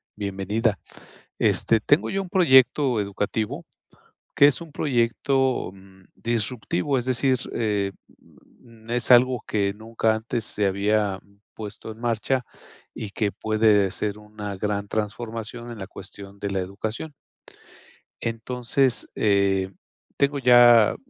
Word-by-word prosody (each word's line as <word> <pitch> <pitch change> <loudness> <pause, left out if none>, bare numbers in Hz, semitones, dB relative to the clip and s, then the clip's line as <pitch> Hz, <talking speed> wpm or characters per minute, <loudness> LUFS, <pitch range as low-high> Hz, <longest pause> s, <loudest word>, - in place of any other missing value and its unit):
bienvenida. 100 +1 -1 0.6
Este, 115 - +3
tengo 145 +8 +2
yo 195 - -1
un 185 - -8
proyecto 130 - +4
educativo, 100 +2 -3 0.7
que 140 - +7
es 145 - 0
un 165 -2 -10
proyecto, 130 -2 0
mm, 95 0 -18
disruptivo. 115 +2 -1
Es 125 - -1
decir, 130 +1 +1
eh, 105 -3 -1 1.0
es 120 +1 +1
algo 125 -1 +5
que 100 -2 0
nunca 110 +1 -1
antes 110 0 -3
se 105 - -1
había 100 0 +1 0.3
puesto 110 +1 -8
en 110 - -12
marcha, 120 +2 -1 0.5
y 110 - -6
que 105 -2 -1
puede 110 -3 +2
ser 105 +2 -3
una 105 -1 -7
gran 100 +1 -2
transformación, 115 +2 -4
en 115 - -8
la 95 - -6
cuestión 100 0 -11
de 100 0 -3
la 95 - -1
educación. 110 +10 -5 1.1
Entonces, 125 +2 -1
eh, 100 -2 +2 0.5
tengo 140 0 +1
ya 120 -3 +6
110 Hz, 120 wpm, -24 LUFS, 100-125 Hz, 1.1 s, que